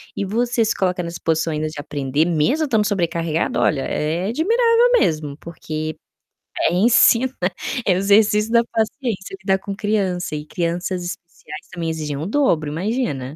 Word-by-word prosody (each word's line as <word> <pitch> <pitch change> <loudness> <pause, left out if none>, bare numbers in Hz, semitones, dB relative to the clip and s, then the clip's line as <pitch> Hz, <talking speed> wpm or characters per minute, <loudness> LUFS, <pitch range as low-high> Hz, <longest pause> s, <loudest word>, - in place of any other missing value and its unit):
E - - -2
você 235 +3 0
se 220 +1 0
coloca 180 -1 0
nessa 170 0 -6
posição 160 0 +1
ainda 155 0 -2
de 155 -1 -7
aprender, 145 +1 -1
mesmo 175 - +1
estando 220 -7 +1
sobrecarregado 170 -5 -1
olha, 140 - +2
é 160 +7 -2
admirável 460 - +3
mesmo, 155 - 0
porque 155 -2 -6 0.7
é 165 - +2
ensina 230 +5 +5 0.5
é 190 - +4
o - - 0
exercício 210 +2 +3
da 235 - +5
paciência, 220 -3 -3
lidar 190 0 +2
com 200 +1 -6
criança 195 -6 -1
e 150 0 -5
crianças 175 +3 -2
especiais 170 -3 -9
também 165 -1 -3
exigem 155 -3 -3
o 150 - -4
dobro, 185 - +1
imagina. 160 - -2
180 Hz, 155 wpm, -20 LUFS, 155-220 Hz, 0.7 s, ensina